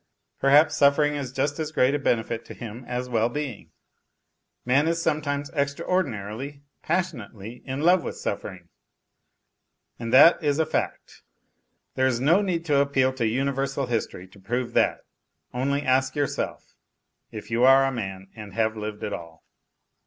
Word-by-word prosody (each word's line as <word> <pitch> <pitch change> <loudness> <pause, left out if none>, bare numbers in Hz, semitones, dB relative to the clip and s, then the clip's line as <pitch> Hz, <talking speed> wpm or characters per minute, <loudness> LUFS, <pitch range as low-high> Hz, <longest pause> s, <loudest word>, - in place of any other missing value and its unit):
Perhaps 145 +3 +5
suffering 145 +1 +4
is 140 -4 -4
just 140 +3 -1
as 155 -1 -3
great 130 -2 +2
a 145 - 0
benefit 115 -3 -1
to - - -10
him 120 +2 -8
as 125 0 -3
well 115 -1 +1
being? 140 -4 -5 1.0
Man 135 +5 +3
is 165 0 0
sometimes 145 -3 -1
extra 140 -2 -2
ordinarily, 140 - -3 0.2
passionately, 120 - -4
in 135 +2 -3
love 175 +2 +4
with - - -5
suffering, 95 -3 -5 1.3
and 115 -1 -4
that 150 +6 +7
is 145 -1 +1
a 160 - +2
fact. 155 - -4 0.7
There 130 0 +2
is 120 -2 0
no 160 +10 +4
need 175 -4 -2
to 145 -3 +3
appeal 135 -2 +2
to 120 -3 -1
universal 135 +3 -1
history 115 -6 -3
to 100 - -18
prove 120 +5 -3
that; - - +1 0.5
only 140 +3 -1
ask 130 -1 +1
yourself, 145 -2 -3 0.6
if 110 +1 -9
you 115 +2 +1
are 135 +1 +7
a 135 - 0
man 95 -5 -6
and 105 -3 -10
have 110 -1 +1
lived 105 -1 -6
at 105 - -3
all. 85 -1 -9
130 Hz, 160 wpm, -25 LUFS, 115-145 Hz, 1.3 s, that